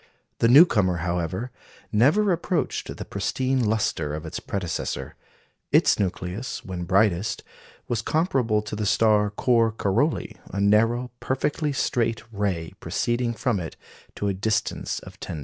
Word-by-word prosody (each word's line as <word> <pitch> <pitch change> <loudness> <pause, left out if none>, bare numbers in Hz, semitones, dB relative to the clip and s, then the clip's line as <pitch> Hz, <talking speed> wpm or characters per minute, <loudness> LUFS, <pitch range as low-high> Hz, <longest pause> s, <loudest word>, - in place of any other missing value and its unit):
The 115 - +4
newcomer, 115 - +6
however, 90 +7 -2 0.4
never 155 - +4
approached 175 0 -2
the - - -6
pristine 130 -1 -1
lustre 105 -9 0
of 80 +1 -6
its 80 - -5
predecessor. 90 -5 -4 0.6
Its - - +4
nucleus, 95 +4 -3
when 90 -2 -5
brightest, 95 +1 +1 0.4
was 115 -2 -1
comparable 125 - +1
to 105 - -5
the 105 -1 -1
star 105 -1 +3
Cor 115 +2 +2
Caroli, 115 +8 0
a 100 - -3
narrow, 115 +5 +3
perfectly 145 +3 -1
straight 115 -4 0
ray 95 -6 -2
proceeding 120 0 -1
from 115 -3 0
it 80 -2 -6 0.4
to 100 - -2
a 100 - +1
distance 110 +3 -1
of - - -13
10°. 80 - -5
110 Hz, 135 wpm, -25 LUFS, 95-125 Hz, 0.6 s, newcomer